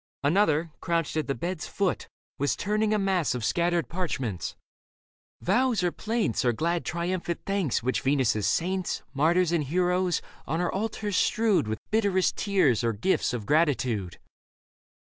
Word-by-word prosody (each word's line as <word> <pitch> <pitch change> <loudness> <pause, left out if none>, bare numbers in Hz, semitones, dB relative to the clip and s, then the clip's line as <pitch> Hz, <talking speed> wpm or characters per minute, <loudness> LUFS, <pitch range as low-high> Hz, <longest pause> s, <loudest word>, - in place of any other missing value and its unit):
Another, 160 0 +2
crouched 165 -3 -1
at 155 - -1
the 140 - -1
bed's 175 -1 -4
foot, 195 -3 -1 0.3
was 140 +1 +1
turning 210 +1 0
A 215 - +3
mass 190 -8 +1
of 120 -3 -3
scattered 170 +4 +1
parchments 135 - -3 0.4
— - - -55
vows 250 -6 +2
or 175 - +2
plaints 220 - -1
I - - +4
2 - - +3
Leda - - +5
Or - - -10
glad 170 +1 0
triumphant 170 0 -2
thanks 195 - 0
which 130 -1 0
Venus' 130 -6 +1
saints, 185 +2 -1
Martyrs 165 +5 +3
and 170 -3 +1
heroes, 180 +3 +1 0.3
on 160 +4 -1
her 180 - 0
altars 210 0 -2
strewed 220 - +2
With 110 0 -2
bitterest 200 -4 +2
tears 150 - +2
or 115 -1 +1
gifts 110 - +1
of 120 -4 -4
gratitude. 130 - +1
170 Hz, 165 wpm, -27 LUFS, 140-190 Hz, 0.4 s, Leda